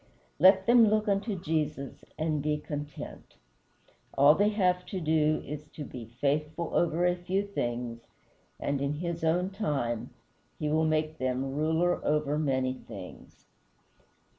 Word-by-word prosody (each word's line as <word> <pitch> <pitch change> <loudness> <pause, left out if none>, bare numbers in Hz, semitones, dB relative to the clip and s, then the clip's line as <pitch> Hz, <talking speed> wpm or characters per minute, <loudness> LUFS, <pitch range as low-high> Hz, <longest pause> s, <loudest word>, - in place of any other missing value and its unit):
Let 190 +3 +6
them 235 -1 +6
look 215 +1 +2
unto 200 +1 0
Jesus, 150 -4 -2
and 155 -2 0
be 150 +1 0
content. 145 -1 -7 0.8
All 140 +2 +8
they 205 +5 +3
have 180 -4 +1
to 190 - -3
do 155 -1 +2
is 150 +1 -7
to 150 - -5
be 120 -4 -8
"faithful 150 +4 -1
over 170 +1 +2
a 180 0 +3
few 185 +3 -1
things," 120 -10 -4 0.5
and 140 -1 -1
in 140 +1 0
his 170 +1 -4
own 175 +4 +1
time 140 - -2 0.5
he 150 - -2
will 160 +1 +2
make 155 0 0
them 130 +1 -1
"ruler 160 +4 +1
over 150 0 +1
many 130 -3 +1
things." 130 - -11
155 Hz, 140 wpm, -29 LUFS, 145-180 Hz, 0.8 s, All